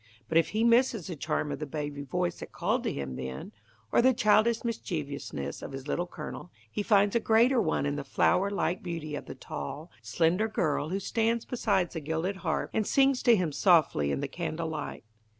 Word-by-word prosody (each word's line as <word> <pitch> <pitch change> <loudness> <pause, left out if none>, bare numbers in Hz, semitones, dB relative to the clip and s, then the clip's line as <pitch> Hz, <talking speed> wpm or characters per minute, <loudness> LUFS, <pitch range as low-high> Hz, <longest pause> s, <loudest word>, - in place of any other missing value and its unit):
But 160 - +4
if 165 - +1
he 220 +2 0
misses 235 -5 +3
the 175 - -5
charm 150 0 -2
of 140 - -4
the 150 - -4
baby 145 -1 -4
voice 175 +5 -2
that - - -8
called - - 0
to - - +1
him 65 -2 -5
then, 65 0 -6 0.4
or - - +5
the 255 +1 +4
childish 215 +2 +3
mischievousness 145 - -4
of - - -7
his 135 +1 -7
Little 175 +4 -1
Colonel, 175 - -8 0.2
he - - -2
finds 205 -1 +3
a - - +5
greater 230 +3 +4
one 160 -6 0
in 145 0 -1
the 145 - -3
flower 180 +7 +2
like 190 -3 -1
beauty 165 -4 -5
of 145 - -5
the - - -7
tall, 145 - -7
slender 165 - +1
girl 160 -8 0
who 190 +3 -1
stands 230 +3 0
beside 200 -8 0
the 165 - -4
gilded 160 +6 -2
harp, 160 -5 -2
and 215 -2 0
sings 270 -1 +3
to 235 - +6
him 180 -6 0
softly 150 - +3
in - - -1
the 140 - -2
candle 165 +2 -4
light. 150 -2 -5
175 Hz, 205 wpm, -29 LUFS, 145-215 Hz, 0.4 s, to